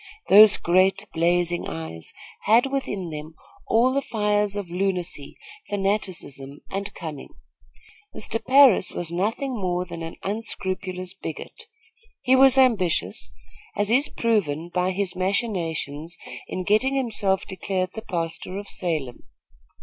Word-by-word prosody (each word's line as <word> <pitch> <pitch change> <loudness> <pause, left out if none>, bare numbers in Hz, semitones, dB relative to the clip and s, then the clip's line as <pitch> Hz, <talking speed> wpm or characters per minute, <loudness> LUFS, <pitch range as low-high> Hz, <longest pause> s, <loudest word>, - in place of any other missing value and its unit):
Those 210 +2 +9
great, 185 +3 +2
blazing 175 +1 +1
eyes 80 0 -6 0.3
had 235 +6 +4
within 205 -10 -3
them 155 +1 -8 0.3
all 245 +3 +3
the 275 - +1
fires 210 -4 0
of 200 -4 -5
lunacy, 180 -5 -2 0.3
fanaticism 185 -9 -2
and 200 +1 -3
cunning. 150 -4 -7 0.9
Mr. 225 +1 -2
Parris 260 -8 +6
was 170 -1 -4
nothing 220 +9 -1
more 180 -4 -1
than 170 -2 -8
an 165 0 -6
unscrupulous 190 -3 -3
bigot. 195 - -8 0.6
He 260 - +4
was 265 0 +6
ambitious, 225 -10 +2 0.5
as 205 +1 +1
is 275 +5 +3
proven 175 -8 -1
by 180 0 +1
his 190 0 -2
machinations 170 -5 -2 0.3
in 185 - -4
getting 220 +8 +2
himself 210 -7 0
declared 185 -1 -3
the 220 - -6
pastor 170 0 -4
of 200 0 -7
Salem. 155 -9 -3
190 Hz, 125 wpm, -24 LUFS, 170-215 Hz, 0.9 s, Those